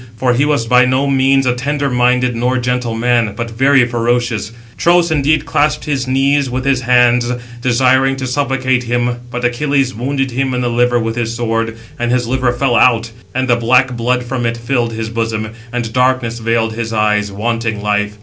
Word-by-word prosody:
For 125 Hz, +1 st, +1 dB
he 135 Hz, +4 st, +2 dB
was 145 Hz, -6 st, 0 dB
by 125 Hz, +2 st, +4 dB
no 130 Hz, +2 st, +1 dB
means 135 Hz, 0 st, +2 dB
a 125 Hz, -, +2 dB
tender 140 Hz, +3 st, -2 dB
minded 125 Hz, -1 st, +1 dB
nor 125 Hz, +2 st, 0 dB
gentle 125 Hz, -2 st, -2 dB
man, 115 Hz, -2 st, +1 dB
but 115 Hz, +1 st, -5 dB
very 135 Hz, +2 st, +3 dB
ferocious. 120 Hz, -2 st, -1 dB
He 115 Hz, -, -18 dB, 0.2 s
(Tros) 170 Hz, -1 st, +3 dB
indeed 150 Hz, 0 st, +1 dB
clasped 150 Hz, +1 st, 0 dB
his 135 Hz, -4 st, -2 dB
knees 135 Hz, +1 st, +1 dB
with 130 Hz, +1 st, -3 dB
his 135 Hz, -2 st, +1 dB
hands, 120 Hz, 0 st, +3 dB, 0.3 s
desiring 130 Hz, +2 st, +2 dB
to 135 Hz, -1 st, -5 dB
supplicate 130 Hz, -1 st, 0 dB
him, 120 Hz, 0 st, -1 dB
but 125 Hz, 0 st, -5 dB
he 120 Hz, -, +3 dB
(Achilles) 135 Hz, 0 st, 0 dB
wounded 135 Hz, +3 st, -2 dB
him 130 Hz, +1 st, -1 dB
in 125 Hz, -, -1 dB
the 120 Hz, -, -1 dB
liver 120 Hz, +1 st, +2 dB
with 115 Hz, -1 st, -2 dB
his 115 Hz, -1 st, -2 dB
sword; 115 Hz, -1 st, -2 dB, 0.2 s
and 120 Hz, 0 st, -1 dB
his 125 Hz, -1 st, +1 dB
liver 130 Hz, 0 st, 0 dB
fell 120 Hz, 0 st, 0 dB
out, 115 Hz, -2 st, +3 dB, 0.2 s
and 130 Hz, 0 st, 0 dB
the 120 Hz, -, +3 dB
black 125 Hz, +2 st, +2 dB
blood 125 Hz, +2 st, 0 dB
from 120 Hz, 0 st, -4 dB
it 115 Hz, 0 st, -2 dB
filled 120 Hz, 0 st, -1 dB
his 110 Hz, 0 st, -4 dB
bosom, 115 Hz, -1 st, -3 dB, 0.2 s
and 120 Hz, -2 st, -4 dB
darkness 125 Hz, -2 st, 0 dB
veiled 115 Hz, 0 st, 0 dB
his 115 Hz, 0 st, -4 dB
eyes, 105 Hz, -1 st, +1 dB
wanting 110 Hz, +1 st, -2 dB
life. 105 Hz, 0 st, -1 dB
125 Hz, 200 wpm, -15 LUFS, 115-130 Hz, 0.3 s, by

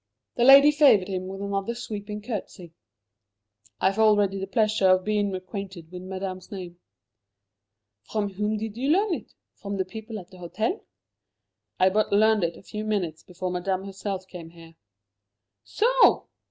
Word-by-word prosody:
The 240 Hz, -, 0 dB
lady 275 Hz, +2 st, +9 dB
favoured 275 Hz, -11 st, +5 dB
him 185 Hz, -1 st, -3 dB
with 195 Hz, +1 st, -6 dB
another 200 Hz, +3 st, -2 dB
sweeping 210 Hz, -3 st, -6 dB
curtsey. 190 Hz, -7 st, -6 dB, 1.1 s
"I 190 Hz, -, +3 dB
have 200 Hz, -, -7 dB
already 205 Hz, -3 st, +3 dB
the 195 Hz, -, -4 dB
pleasure 215 Hz, -2 st, +2 dB
of 185 Hz, 0 st, +4 dB
being 205 Hz, -2 st, 0 dB
acquainted 185 Hz, -3 st, -7 dB
with 180 Hz, 0 st, -8 dB
Madame's 185 Hz, 0 st, -6 dB
name." 180 Hz, -3 st, -8 dB, 1.2 s
"From 205 Hz, -, -3 dB
whom 210 Hz, +2 st, -1 dB
did 220 Hz, 0 st, -5 dB
you 265 Hz, +3 st, -1 dB
learn 390 Hz, +4 st, +3 dB
it? -, -, -7 dB, 0.2 s
From 200 Hz, -1 st, -6 dB
the 190 Hz, -, -1 dB
people 220 Hz, +3 st, -8 dB
at 185 Hz, -2 st, -11 dB
the 185 Hz, -, -14 dB
hotel?" 215 Hz, -, -3 dB, 1.0 s
"I 185 Hz, +1 st, +4 dB
but 215 Hz, +2 st, +1 dB
learned 215 Hz, 0 st, +4 dB
it 170 Hz, 0 st, -2 dB
a -, -, -15 dB
few 210 Hz, 0 st, -6 dB
minutes 190 Hz, -7 st, -2 dB
before 180 Hz, 0 st, -5 dB
Madame 185 Hz, +1 st, -2 dB
herself 195 Hz, -1 st, -5 dB
came 175 Hz, -3 st, -10 dB
here." 165 Hz, -1 st, -15 dB, 0.9 s
"So! -, -, +3 dB
200 Hz, 160 wpm, -25 LUFS, 185-215 Hz, 1.2 s, lady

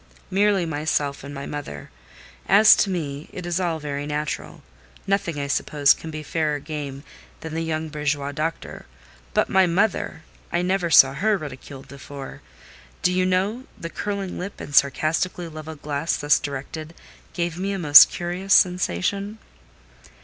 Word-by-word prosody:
"Merely 195 Hz, -1 st, +2 dB
myself 145 Hz, -3 st, -2 dB
and 140 Hz, -, -8 dB
my 140 Hz, -1 st, -6 dB
mother. 140 Hz, -, -7 dB, 0.6 s
As 210 Hz, +3 st, +8 dB
to 200 Hz, -, +2 dB
me 150 Hz, -5 st, -4 dB
it 180 Hz, -, -7 dB
is 175 Hz, +1 st, -1 dB
all 170 Hz, -3 st, -1 dB
very 145 Hz, -1 st, -4 dB
natural: 150 Hz, 0 st, -4 dB, 0.4 s
nothing, 195 Hz, -6 st, -1 dB
I 140 Hz, -, -2 dB
suppose, 145 Hz, 0 st, +3 dB
can 160 Hz, -, -9 dB
be 155 Hz, -1 st, -6 dB
fairer 155 Hz, -1 st, -1 dB
game 145 Hz, -2 st, -6 dB, 0.4 s
than 160 Hz, -1 st, -7 dB
the 165 Hz, -, -2 dB
young 160 Hz, -1 st, -2 dB
bourgeois 145 Hz, -1 st, -2 dB
doctor; 155 Hz, +3 st, -5 dB, 0.5 s
but -, -, +3 dB
my 190 Hz, -1 st, +4 dB
mother! 180 Hz, -2 st, 0 dB, 0.3 s
I 175 Hz, -, 0 dB
never 180 Hz, -1 st, 0 dB
saw 135 Hz, -4 st, +7 dB
her 205 Hz, +8 st, +1 dB
ridiculed 140 Hz, -3 st, -9 dB
before. 140 Hz, 0 st, -10 dB, 0.6 s
Do 180 Hz, -, +3 dB
you 185 Hz, 0 st, +1 dB
know, 200 Hz, +7 st, 0 dB
the 170 Hz, -, -7 dB
curling 200 Hz, -2 st, -4 dB
lip, 195 Hz, +3 st, -6 dB
and 145 Hz, -, -8 dB
sarcastically 155 Hz, +6 st, +1 dB
levelled 155 Hz, -1 st, -9 dB
glass 150 Hz, +2 st, -1 dB
thus 145 Hz, 0 st, +3 dB
directed, 145 Hz, +3 st, -6 dB, 0.4 s
gave 170 Hz, -1 st, -3 dB
me 195 Hz, +2 st, -2 dB
a 195 Hz, -, -2 dB
most 150 Hz, -5 st, +9 dB
curious 180 Hz, +3 st, 0 dB
sensation?" 180 Hz, -, +1 dB
160 Hz, 155 wpm, -23 LUFS, 145-185 Hz, 0.6 s, most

